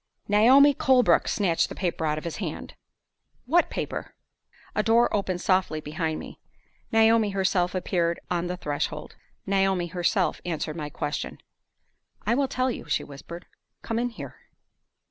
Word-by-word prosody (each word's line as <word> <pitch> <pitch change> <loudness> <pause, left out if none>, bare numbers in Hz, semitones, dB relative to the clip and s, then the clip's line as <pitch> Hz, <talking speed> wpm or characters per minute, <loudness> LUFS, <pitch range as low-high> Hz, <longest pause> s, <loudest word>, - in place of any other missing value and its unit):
"Naomi 255 +8 +6
Colebrook 260 -2 +3
snatched 180 -6 +1
the - - -7
paper 170 -3 -2
out 150 0 0
of 155 - -5
his 170 - -5
hand." - - -5 0.7
"What 335 +7 +3
paper?" - - -5 0.6
A - - +1
door 230 +2 +3
opened 185 -3 -1
softly 185 -5 +1
behind 155 +1 -3
me. - - -10 0.5
Naomi 225 -1 +4
herself 190 -2 0
appeared 170 -2 0
on 175 0 -1
the 180 +1 -4
threshold; 145 -4 -4 0.3
Naomi 195 -2 +1
herself 175 +3 0
answered 160 -2 -3
my 150 -3 -5
question. 145 0 -4 0.9
"I 220 - +2
will 275 +2 +2
tell 255 0 0
you," - - -7
she - - 0
whispered. 160 +5 -10 0.4
"Come 225 0 -2
in 245 +1 0
here." 230 - -9
185 Hz, 145 wpm, -26 LUFS, 170-225 Hz, 0.9 s, Naomi